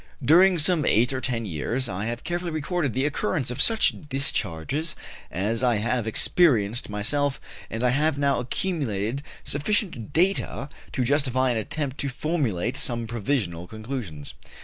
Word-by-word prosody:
During 180 +6 +6
some 165 0 +4
eight 120 +3 +3
or 130 - -2
ten 120 -2 -1
years 105 - -2
I 100 +2 -3
have 120 +1 -4
carefully 175 0 -2
recorded 155 -3 -1
the 130 +2 0
occurrence 140 -2 -1
of 125 - -2
such 225 -1 +5 0.2
discharges 135 - -1 0.3
as 105 +6 -1
I 125 -2 +3
have 115 +2 -1
experienced 115 - +2
myself, 135 +7 0 0.3
and 115 +2 -3
I 125 - +4
have 145 +3 +1
now 140 -1 +2
accumulated 125 - -2 0.2
sufficient 150 - -1
data 165 -5 +1 0.2
to 130 - 0
justify 130 -1 +2
an 120 - 0
attempt 140 +5 -3
to 140 - -1
formulate 125 - -1
some 120 -2 0
provisional 105 -7 -2
conclusions. 110 - -6
130 Hz, 150 wpm, -25 LUFS, 110-150 Hz, 0.3 s, During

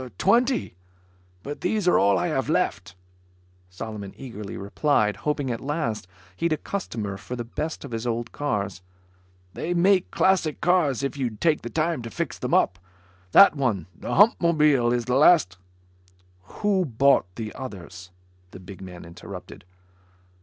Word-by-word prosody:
"Twenty; 240 - +2 0.7
but 145 +1 -6
these 190 +1 0
are 180 - +5
all 100 0 +4
I 85 - 0
have - - -1
left," 90 0 -1 0.7
Solomon 100 +1 -7
eagerly 105 -6 -7
replied, 105 +1 +1
hoping 145 -3 -2
at 115 - -4
last 135 - -3 0.3
he'd 170 - -1
a - - -1
customer 110 - -4
for 115 +5 -7
the 120 - -4
best 150 +6 -5
of 135 - -9
his 115 +1 -3
old 115 0 -2
cars. 100 -10 -3 0.7
"They 175 +2 -3
make 185 +1 +3
classic 185 -5 +1
cars, 160 -8 +2
if 140 +1 -3
you'd 120 -6 -3
take 160 -3 +2
the 120 - -6
time 160 0 -1
to 115 - -7
fix 145 -2 -4
them 125 - 0
up. 90 -2 +2 0.5
That 195 -5 +8
one, 115 - -1
the - - -5
Hupmobile, 155 - +4
is 120 -1 0
the 125 - -1
last 140 - +5 0.4
" 90 0 -33 0.2
"Who 200 -3 +2
bought 135 - +3
the 110 -2 -5
others?" 95 -7 -9 0.4
the 95 - -12
big 95 +1 -11
man 90 -2 -9
interrupted. 85 +1 -10
125 Hz, 155 wpm, -25 LUFS, 100-160 Hz, 0.7 s, That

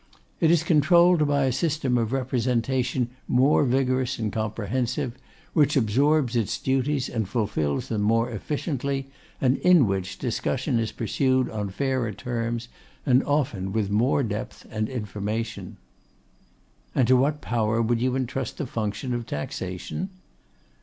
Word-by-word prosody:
It 165 - +4
is 170 -1 +4
controlled 170 +1 +5
by 140 -1 +2
a 130 - +2
system 145 -3 0
of 115 -2 0
representation 125 -1 0 0.2
more 135 +4 +4
vigorous 130 0 +1
and 110 -4 -2
comprehensive; 115 +3 -2 0.4
which 150 -2 +3
absorbs 135 +3 +2
its 115 -4 0
duties 135 +1 0
and 110 -5 -3
fulfils 100 - -1
them 110 -2 -1
more 115 +3 +2
efficiently, 135 - -3 0.3
and 130 0 +2
in 180 -7 +5
which 95 -2 -2
discussion 125 +1 -1
is 110 -1 -1
pursued 130 +3 0
on 105 -2 -3
fairer 130 +1 -1
terms, 115 +1 -3 0.4
and 130 0 +4
often 130 -10 0
with 105 -3 0
more 125 +7 +2
depth 110 +1 -5
and 110 -1 -2
information.' 105 -3 -4 1.2
'And 125 - +3
to 130 - +6
what 145 +4 +2
power 115 -3 0
would 115 0 +1
you 130 0 +1
entrust 130 -1 -3
the 150 - -2
function 115 +2 -3
of 120 -1 -3
Taxation? 90 - -4
125 Hz, 140 wpm, -25 LUFS, 110-135 Hz, 1.2 s, to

